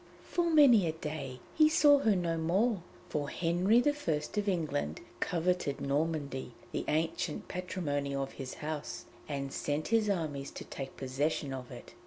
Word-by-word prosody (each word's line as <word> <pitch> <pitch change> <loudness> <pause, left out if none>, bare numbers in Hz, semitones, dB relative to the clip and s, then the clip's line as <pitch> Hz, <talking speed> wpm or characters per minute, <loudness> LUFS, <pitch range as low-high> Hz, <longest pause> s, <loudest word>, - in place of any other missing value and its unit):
For 345 -1 0
many 265 - +7
a 160 - 0
day 145 -5 -5
he 310 -1 +6
saw 295 -3 +6
her 220 -6 +3
no 170 -2 0
more, 190 +6 +1 0.3
for 145 -2 -2
Henry 180 +9 +3
I - - +6 0.2
of 200 +7 -1
England 150 - -1 0.2
coveted 175 -4 0
Normandy, 140 -3 -1 0.2
the - - -2
ancient 160 +1 -1
patrimony 145 -6 -2
of 135 0 -2
his 130 -1 -7
house, 155 -1 -5 0.2
and 140 -1 -3
sent 150 +1 -2
his 225 -2 +3
armies 155 -7 -1
to - - -7
take 135 -1 -7
possession 135 +2 -1
of 130 -2 -6
it. - - -10
160 Hz, 155 wpm, -32 LUFS, 140-190 Hz, 0.3 s, many